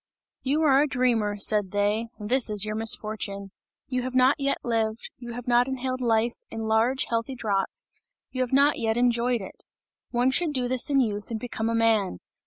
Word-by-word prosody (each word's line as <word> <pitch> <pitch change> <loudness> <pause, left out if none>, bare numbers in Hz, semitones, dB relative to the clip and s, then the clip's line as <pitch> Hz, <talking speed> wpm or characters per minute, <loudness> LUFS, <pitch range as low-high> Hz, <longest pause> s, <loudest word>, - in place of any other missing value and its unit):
"You 290 +4 0
are 275 -2 +5
a 300 - +2
dreamer," 235 -6 0
said 205 -1 +2
they, 205 +3 0
"this 235 +4 +2
is 210 -1 +2
your 215 - -3
misfortune! 215 -2 -1 0.4
You 255 -1 -2
have 255 +1 -5
not 260 +3 +4
yet 275 0 0
lived, 225 -1 -2
you 240 -1 -8
have 245 +1 -8
not 245 +1 +3
inhaled 260 -1 -3
life 230 0 +1
in 225 - -6
large 225 +4 +1
healthy 230 +3 -2
draughts, 200 -5 -2 0.4
you 255 - -3
have 250 - -1
not 280 +2 +3
yet 225 -1 0
enjoyed 240 -1 +1
it. 190 - -10 0.5
One 245 +2 +1
should 315 +2 +1
do 255 -3 0
this 255 +1 0
in 275 -1 +3
youth 210 -4 -3
and 225 -2 -3
become 225 -2 -3
a 230 - 0
man! 225 - +2
235 Hz, 195 wpm, -26 LUFS, 220-255 Hz, 0.5 s, are